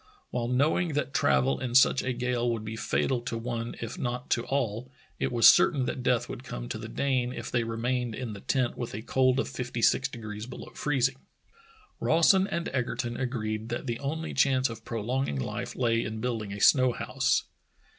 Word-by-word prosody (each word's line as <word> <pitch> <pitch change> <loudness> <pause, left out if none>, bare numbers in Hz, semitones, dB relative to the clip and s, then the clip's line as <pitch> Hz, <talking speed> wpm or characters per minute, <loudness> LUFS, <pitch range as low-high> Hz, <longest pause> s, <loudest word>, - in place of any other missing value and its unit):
While 120 -1 -1
knowing 150 +6 +1
that 140 -1 -2
travel 65 0 +2
in 125 -2 -3
such 130 0 +6
a 130 - -1
gale 125 0 -1
would 110 -2 -3
be 110 +1 -5
fatal 120 +2 0
to 120 -1 -4
one 115 0 -4
if 115 0 -5
not 125 0 -3
to 120 - +2
all, 125 -3 -1 0.3
it - - 0
was 120 -2 +6
certain 135 -4 +6
that 125 - -3
death 125 -1 +1
would - - -7
come - - -6
to - - -4
the - - -6
Dane 130 -3 0
if - - -6
the}^ 120 -2 0
remained 120 0 -1
in 120 -3 -5
the 100 - -8
tent 125 +3 0
with 120 -4 -5
a 110 - -6
cold 130 +1 +2
of - - 0
fifty 120 -2 -4
six - - +4
degrees 110 -1 -7
below 125 - -9
freezing. 135 -2 0 0.8
Rawson 185 +4 +4
and 170 -3 -2
Egerton 120 -2 -2
agreed 110 -3 -3
that 120 - -3
the 120 -3 -3
only 160 +3 -3
chance 130 -2 +3
of 115 0 -9
prolonging 115 - -2
life - - -4
lay 115 -2 +1
in 110 0 -4
building 110 -4 -3
a 100 - -5
snow 130 +2 +5
house. - - 0
120 Hz, 195 wpm, -28 LUFS, 115-130 Hz, 0.8 s, such